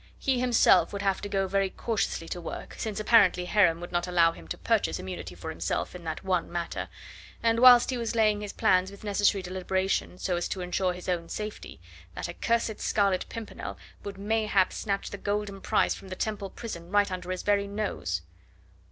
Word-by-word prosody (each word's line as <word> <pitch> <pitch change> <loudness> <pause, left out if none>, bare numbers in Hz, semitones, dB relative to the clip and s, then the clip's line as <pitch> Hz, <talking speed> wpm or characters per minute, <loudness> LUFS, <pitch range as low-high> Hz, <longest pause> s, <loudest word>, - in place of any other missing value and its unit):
He 265 -2 0
himself 235 -8 +4
would 200 0 -4
have 195 -1 +1
to 205 - -5
go 195 -1 0
very 195 0 +1
cautiously 195 -5 -2
to 175 - -4
work, 165 - -7
since 215 -3 -3
apparently 205 -5 +4
Heron 180 -4 +3
would 175 - -7
not 175 0 0
allow 170 -2 +4
him 80 - -13
to - - -4
purchase 80 - +1
immunity 95 0 -6
for - - -6
himself - - -2
in 180 -1 -9
that 160 -1 -4
one 185 -3 0
matter, 170 -1 -3 0.5
and 230 0 +3
whilst 245 0 +8
he 255 - -1
was 230 0 -2
laying 215 -2 +3
his 205 -1 -5
plans 185 0 +2
with 200 +1 -13
necessary 205 -1 +2
deliberation 185 0 -1
so 180 -1 -1
as 175 - -1
to 190 - -4
ensure 180 +1 0
his 180 0 -9
own 170 -2 -1
safety, 210 - -6 0.4
that - - -4
accursed 230 +5 -1
Scarlet 200 -3 +1
Pimpernel 230 -2 -7 0.3
would 200 -1 -6
mayhap 210 -2 +1
snatch 200 -2 -2
the 205 - -6
golden 205 -1 -2
prize - - +2
from - - -11
the 185 - -5
Temple 205 -1 -3
prison 175 -8 -7
right 205 0 +3
under 180 -1 -5
his 185 0 -3
very 200 -1 +2
nose. 200 - -3
195 Hz, 195 wpm, -28 LUFS, 180-210 Hz, 0.5 s, whilst